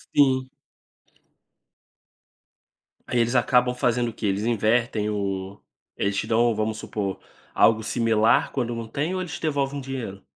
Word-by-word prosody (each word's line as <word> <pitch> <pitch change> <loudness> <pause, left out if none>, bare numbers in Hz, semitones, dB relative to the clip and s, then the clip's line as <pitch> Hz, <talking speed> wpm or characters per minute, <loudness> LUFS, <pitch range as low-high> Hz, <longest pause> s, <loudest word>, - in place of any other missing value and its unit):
Sim. 130 -2 +3 2.6
Aí 120 - 0
eles 120 +2 +1
acabam 125 +1 +3
fazendo 120 -1 0
o - - -9
quê? 105 - -3
Eles 100 +2 0
invertem 115 -1 +1
o 100 -1 -3 0.4
eles 100 0 0
te - - -1
dão, 115 0 +2
vamos 110 0 -1
supor, 100 -3 -4 0.3
algo 110 -1 +4
similar 115 -2 +2
quando 120 -3 -1
não 115 -1 -5
têm 150 +9 -2
ou 185 - -2
eles 175 -4 -6
te - - -6
devolvem 140 -2 -1
dinheiro? 125 -7 -6
115 Hz, 145 wpm, -24 LUFS, 105-130 Hz, 2.6 s, algo